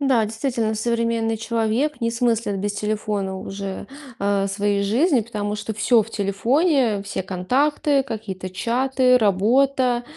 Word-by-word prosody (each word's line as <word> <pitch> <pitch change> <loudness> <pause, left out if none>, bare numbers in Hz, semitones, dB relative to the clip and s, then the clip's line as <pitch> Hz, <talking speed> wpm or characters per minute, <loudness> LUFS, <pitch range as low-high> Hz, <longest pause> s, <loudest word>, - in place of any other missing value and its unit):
Да, 260 -5 +3
действительно, 225 0 -2
современный 230 0 0
человек 230 +5 -1
не 230 0 0
смыслит 230 -4 0
без 205 +1 -2
телефона 205 -2 -2
уже, 195 0 -6 0.3
э, 200 0 +1
своей 200 0 0
жизни, 250 - +2
потому 210 -2 -4
что 210 +1 -4
всё 225 +2 +3
в 220 - -11
телефоне, 230 - +1
все 200 - -4
контакты, 270 +10 +1
какие-то 210 -7 -6
чаты, 250 +5 +2
работа. 245 +4 +2
225 Hz, 130 wpm, -22 LUFS, 205-250 Hz, 0.3 s, Да